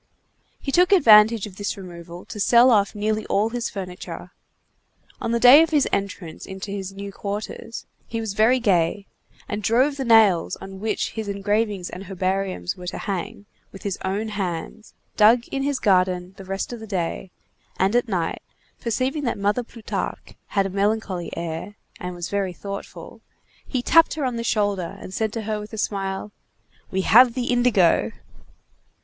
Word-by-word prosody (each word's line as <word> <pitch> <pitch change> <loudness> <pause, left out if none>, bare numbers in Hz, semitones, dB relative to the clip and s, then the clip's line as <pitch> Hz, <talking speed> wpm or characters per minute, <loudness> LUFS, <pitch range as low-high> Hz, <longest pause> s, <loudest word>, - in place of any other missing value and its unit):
He 275 - -4
took 360 +5 +4
advantage 220 - +6
of 195 -3 -11
this 205 0 -3
removal 175 -2 -10
to 210 - -8
sell 240 +5 +6
off 205 -2 +2
nearly 215 +1 -1
all 210 +3 +1
his 240 0 -3
furniture. 185 -3 -7 0.9
On 230 - -1
the 235 - +1
day 255 +6 +9
of 325 - +2
his 295 -3 +2
entrance 190 -4 -4
into 190 +1 -7
his 195 -1 -4
new 200 +1 -7
quarters, 205 +3 -6 0.2
he 230 - -3
was 220 -3 -3
very 225 +5 +4
gay, 195 -2 +1 0.4
and 205 - -3
drove 255 +7 +2
the 270 - -2
nails 220 -8 +4
on 195 0 -10
which 220 +2 -2
his 220 -2 -5
engravings 205 -1 -1
and 190 +2 -8
herbariums 190 - -2
were 180 0 -9
to - - -4
hang, 205 +2 -4 0.3
with 195 - -12
his 200 -3 -3
own 200 +4 -2
hands, 195 +1 -5 0.2
dug 225 +3 +6
in 275 - -2
his 280 0 0
garden 185 -3 +1
the 195 - -11
rest 195 +5 -4
of 240 - -7
the 220 - -9
day, 185 -1 -3 0.5
and 195 +4 +2
at 245 0 +2
night, 180 -6 -2 0.4
perceiving 260 +5 -1
that 235 - -1
Mother 205 +4 +1
Plutarque 230 -2 -6
had 195 -1 +1
a - - -2
melancholy 200 -2 -1
air, 170 +4 -5 0.2
and 180 0 -5
was 175 0 -4
very 195 -2 -2
thoughtful, 200 +2 -8 0.5
he 255 -3 -2
tapped 330 +4 +5
her 300 -3 -2
on 250 -2 -1
the 230 - -3
shoulder 200 -4 -1
and 185 - -9
said 220 +1 -1
to 225 - -4
her 215 0 -2
with 210 +2 -9
a - - -5
smile: 195 -1 -3 0.6
"We 190 -1 -1
have 235 +5 +6
the 250 -1 -1
indigo!" 240 -8 +3
205 Hz, 175 wpm, -23 LUFS, 190-230 Hz, 0.9 s, day